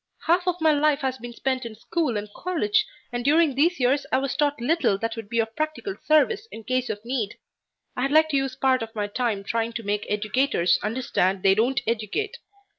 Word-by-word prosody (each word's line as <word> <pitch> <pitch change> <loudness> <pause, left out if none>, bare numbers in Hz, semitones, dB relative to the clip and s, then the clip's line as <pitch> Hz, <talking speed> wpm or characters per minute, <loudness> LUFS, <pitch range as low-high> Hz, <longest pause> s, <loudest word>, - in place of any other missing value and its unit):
Half 355 +2 +2
of 360 0 0
my 320 -1 +4
life 300 0 +2
has 260 -1 -2
been 240 +1 -7
spent 260 +2 -2
in 230 -2 -7
school 250 +1 -1
and 205 0 -4
college, 415 +5 0 0.2
and 240 0 -3
during 305 +2 +4
these 325 +6 +2
years 265 +3 +2
I - - +4
was 270 -1 -1
taught 290 -2 +1
little 250 - +2
that 225 +2 -3
would 225 -3 -8
be 235 - -2
of 225 0 0
practical 310 +6 -3
service 395 +9 +3
in 225 - -9
case 255 +2 -1
of 205 +2 -5
need. 235 -5 -2 0.6
I'd 260 +2 0
like 315 +2 +5
to 285 - +1
use 270 -1 -1
part 260 -1 +2
of 225 0 -6
my 210 -1 -1
time 210 -1 -2
trying 230 +3 -1
to 230 - -5
make 205 0 -2
educators 210 -3 +1
understand 205 -4 0
they 195 - +6
don't 240 +5 +1
educate. 235 - -2
255 Hz, 210 wpm, -25 LUFS, 225-305 Hz, 0.6 s, they